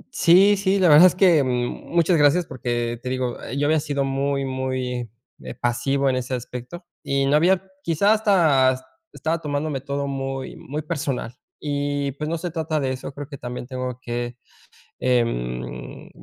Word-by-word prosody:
Sí, 195 Hz, +4 st, +6 dB
sí, 195 Hz, 0 st, +1 dB
la 185 Hz, -3 st, +4 dB
verdad 155 Hz, +4 st, +9 dB
es 180 Hz, -, 0 dB
que, 180 Hz, -6 st, +5 dB
mm, 125 Hz, -2 st, -2 dB
muchas 170 Hz, 0 st, +4 dB
gracias, 150 Hz, +4 st, +4 dB
porque 120 Hz, -3 st, -3 dB
te 125 Hz, -, -4 dB
digo, 130 Hz, -1 st, -2 dB, 0.2 s
yo 145 Hz, -, +1 dB
había 155 Hz, +1 st, +3 dB
sido 145 Hz, -2 st, -1 dB
muy, 135 Hz, 0 st, -1 dB
muy, 130 Hz, -2 st, -3 dB, 0.3 s
eh, 65 Hz, -1 st, -8 dB
pasivo 135 Hz, +3 st, 0 dB
en 130 Hz, -, +2 dB
ese 130 Hz, 0 st, -2 dB
aspecto 125 Hz, +8 st, -8 dB, 0.2 s
y 140 Hz, -2 st, 0 dB
no 140 Hz, +2 st, +3 dB
había 180 Hz, +4 st, +3 dB, 0.2 s
quizá 195 Hz, +5 st, +3 dB
hasta 160 Hz, -12 st, +3 dB, 0.3 s
estaba 165 Hz, +1 st, -2 dB
tomándome 145 Hz, -2 st, -2 dB
todo 140 Hz, +1 st, -3 dB
muy 135 Hz, -1 st, -4 dB
muy 150 Hz, +3 st, -6 dB
personal 145 Hz, -7 st, -3 dB, 0.3 s
y 145 Hz, -1 st, -2 dB
pues, 150 Hz, +3 st, -5 dB
no 170 Hz, -, -1 dB
se 175 Hz, +1 st, -4 dB
trata 160 Hz, -1 st, -1 dB
de 135 Hz, -2 st, -1 dB
eso. 130 Hz, +2 st, -5 dB
Creo 140 Hz, 0 st, -8 dB
que 140 Hz, -2 st, -9 dB
también 125 Hz, 0 st, -6 dB
tengo 130 Hz, -1 st, -4 dB
que, 120 Hz, 0 st, -4 dB, 0.6 s
em, 60 Hz, -, -2 dB
140 Hz, 170 wpm, -23 LUFS, 125-155 Hz, 0.6 s, verdad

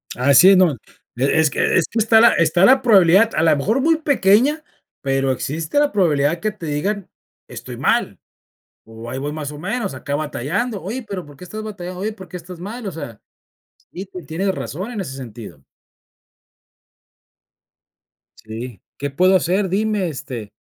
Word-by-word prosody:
Así 140 Hz, +8 st, +6 dB
es, 195 Hz, -, +6 dB
no, 180 Hz, -3 st, +5 dB, 0.5 s
e 135 Hz, +5 st, +2 dB
es 160 Hz, -2 st, +4 dB
que -, -, 0 dB
es 170 Hz, -, +2 dB
que 225 Hz, -, -2 dB
está 220 Hz, +1 st, +5 dB
la 235 Hz, -, +8 dB
está 170 Hz, +2 st, +2 dB
la 260 Hz, +3 st, +6 dB
probabilidad, 205 Hz, -2 st, +5 dB
a -, -, +1 dB
la 160 Hz, -2 st, +4 dB
mejor 215 Hz, -, 0 dB
muy 325 Hz, +3 st, +3 dB
pequeña, 285 Hz, +1 st, +2 dB, 0.4 s
pero 135 Hz, -1 st, 0 dB
existe 155 Hz, -, -2 dB
la 290 Hz, 0 st, +2 dB
probabilidad 165 Hz, -4 st, +1 dB
que 215 Hz, +3 st, -1 dB
te 205 Hz, -5 st, -10 dB
digan: 190 Hz, +7 st, -2 dB, 0.4 s
"Estoy -, -, -8 dB
mal" -, -, 0 dB, 0.7 s
o 115 Hz, +1 st, -10 dB
"ahí 130 Hz, -, -4 dB
voy 145 Hz, +2 st, -4 dB
más 150 Hz, -2 st, -5 dB
o 145 Hz, -, -9 dB
menos, 200 Hz, +5 st, -3 dB
acá 140 Hz, +2 st, -5 dB
batallando", 170 Hz, -, -3 dB
oye, 225 Hz, +8 st, -5 dB
pero, 195 Hz, -5 st, -6 dB
¿por 145 Hz, -1 st, -15 dB
qué 180 Hz, -, -11 dB
estás 215 Hz, +4 st, -7 dB
batallando?, 185 Hz, -4 st, -7 dB
oye, 215 Hz, +2 st, -2 dB
¿por 190 Hz, -4 st, -12 dB
qué 180 Hz, -, -8 dB
estás 175 Hz, +1 st, -11 dB
mal?, 225 Hz, +6 st, -7 dB
o -, -, -2 dB
sea, 145 Hz, -9 st, -8 dB, 0.7 s
sí 190 Hz, -, -7 dB
ten 185 Hz, -4 st, -10 dB
tienes 190 Hz, +6 st, -1 dB
razón 185 Hz, +5 st, -5 dB
en 215 Hz, -4 st, -4 dB
ese 135 Hz, -8 st, -6 dB
sentido. 120 Hz, -3 st, -10 dB, 2.8 s
Sí. 115 Hz, 0 st, -8 dB, 0.2 s
¿Qué 140 Hz, -, -3 dB
puedo 185 Hz, +7 st, +3 dB
hacer?, 185 Hz, +2 st, +1 dB
dime 205 Hz, 0 st, 0 dB
este, 120 Hz, -7 st, -7 dB
180 Hz, 175 wpm, -20 LUFS, 145-210 Hz, 2.8 s, la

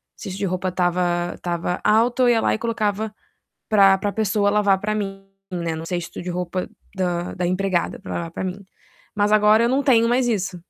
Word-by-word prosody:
cesto 190 Hz, 0 st, -7 dB
de 200 Hz, -, -1 dB
roupa 185 Hz, 0 st, -2 dB
estava 175 Hz, -1 st, 0 dB
estava 175 Hz, 0 st, -3 dB
alto, 235 Hz, +4 st, +3 dB
eu 245 Hz, -, +5 dB
ia 230 Hz, -2 st, +3 dB
lá -, -, +2 dB
e -, -, 0 dB
colocava 220 Hz, -2 st, -1 dB, 0.6 s
pra 195 Hz, -3 st, +6 dB
pra 205 Hz, +1 st, -2 dB
pessoa 210 Hz, -2 st, +1 dB
lavar 205 Hz, -2 st, +3 dB
pra 215 Hz, +1 st, -1 dB
mim, 195 Hz, -2 st, -4 dB, 0.3 s
né, 170 Hz, -2 st, -3 dB
no 160 Hz, +1 st, -6 dB
cesto 175 Hz, -2 st, -4 dB
de 180 Hz, -, -6 dB
roupa 180 Hz, +1 st, -3 dB, 0.3 s
da 175 Hz, -2 st, -2 dB
da 180 Hz, -1 st, -2 dB
empregada 185 Hz, -1 st, -1 dB
pra -, -, -8 dB
lavar 170 Hz, -1 st, -4 dB
pra -, -, -4 dB
mim. 190 Hz, +2 st, -5 dB, 0.5 s
Mas 205 Hz, 0 st, +1 dB
agora 215 Hz, +1 st, +5 dB
eu 235 Hz, -, +3 dB
não 270 Hz, +3 st, +1 dB
tenho 230 Hz, -4 st, +4 dB
mais 245 Hz, +1 st, +2 dB
isso. 190 Hz, -5 st, -2 dB
195 Hz, 200 wpm, -22 LUFS, 180-215 Hz, 0.6 s, pra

